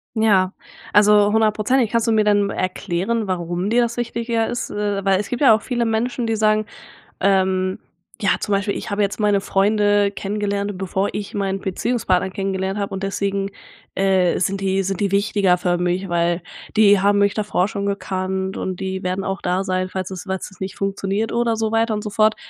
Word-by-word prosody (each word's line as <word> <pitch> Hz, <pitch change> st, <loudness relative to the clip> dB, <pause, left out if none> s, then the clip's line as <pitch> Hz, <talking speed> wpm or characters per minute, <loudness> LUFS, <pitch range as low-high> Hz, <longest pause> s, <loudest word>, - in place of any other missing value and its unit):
Ja, 200 Hz, -4 st, +3 dB, 0.4 s
also 210 Hz, 0 st, +5 dB
hundertprozentig. 220 Hz, +2 st, +2 dB
Kannst 230 Hz, -1 st, +1 dB
du 230 Hz, -, +3 dB
mir, 220 Hz, -, +4 dB
äh, -, -, +2 dB
dann 205 Hz, -1 st, +2 dB
erklären, 195 Hz, +4 st, -2 dB
warum 175 Hz, +1 st, -2 dB
dir 240 Hz, +2 st, +3 dB
das 235 Hz, 0 st, -2 dB
wichtiger 230 Hz, -1 st, -1 dB
ist? 240 Hz, -, -3 dB
Äh, 205 Hz, -1 st, -2 dB
weil 195 Hz, -1 st, +3 dB
es 205 Hz, -, -4 dB
gibt 245 Hz, -, -3 dB
ja 265 Hz, -6 st, +7 dB
auch 220 Hz, -, -3 dB
viele 240 Hz, -2 st, -1 dB
Menschen, 235 Hz, +2 st, -1 dB
die 225 Hz, -1 st, 0 dB
sagen, 215 Hz, 0 st, +2 dB, 0.5 s
ähm, 190 Hz, -1 st, +1 dB, 0.4 s
ja, 200 Hz, -, +2 dB
zum -, -, -4 dB
Beispiel: 200 Hz, +1 st, 0 dB
„Ich -, -, -6 dB
habe 200 Hz, +1 st, 0 dB
jetzt 200 Hz, +1 st, -1 dB
meine 205 Hz, -2 st, +2 dB
Freunde 205 Hz, 0 st, +2 dB
kennengelernt, 200 Hz, 0 st, -3 dB
bevor 190 Hz, +1 st, -1 dB
ich 205 Hz, +2 st, -5 dB
meinen 195 Hz, -2 st, -1 dB
Beziehungspartner 190 Hz, -1 st, 0 dB
kennengelernt 190 Hz, 0 st, -2 dB
habe 200 Hz, -1 st, -3 dB
und 190 Hz, -, -4 dB
deswegen, 195 Hz, 0 st, -1 dB, 0.5 s
äh, 190 Hz, -2 st, +2 dB
sind 195 Hz, +2 st, -1 dB
die 195 Hz, 0 st, +1 dB
sind 195 Hz, 0 st, -3 dB
die 200 Hz, -1 st, +1 dB
wichtiger 200 Hz, -2 st, +2 dB
für 175 Hz, 0 st, 0 dB
mich, 180 Hz, +2 st, -1 dB
weil 170 Hz, 0 st, 0 dB, 0.3 s
die 205 Hz, -2 st, +6 dB
haben 205 Hz, +1 st, +3 dB
mich 200 Hz, 0 st, +3 dB
davor 205 Hz, -3 st, 0 dB
schon 200 Hz, -1 st, -3 dB
gekannt 190 Hz, -1 st, -2 dB
,und 185 Hz, -1 st, -4 dB
die 190 Hz, 0 st, -3 dB
werden 185 Hz, +1 st, -2 dB
auch 195 Hz, 0 st, -3 dB
da 180 Hz, +2 st, 0 dB
sein, 185 Hz, -1 st, -1 dB
falls 185 Hz, 0 st, -4 dB
es 185 Hz, -, -6 dB
falls 190 Hz, +1 st, -4 dB
es 190 Hz, -, -18 dB
nicht 190 Hz, 0 st, -5 dB
funktioniert." 195 Hz, +2 st, -2 dB
Oder 235 Hz, -1 st, +1 dB
so 220 Hz, -1 st, -1 dB
weiter 225 Hz, -1 st, +1 dB
und 210 Hz, -, -4 dB
so 210 Hz, -, -5 dB
fort. 215 Hz, +1 st, +3 dB
200 Hz, 200 wpm, -21 LUFS, 190-215 Hz, 0.5 s, ja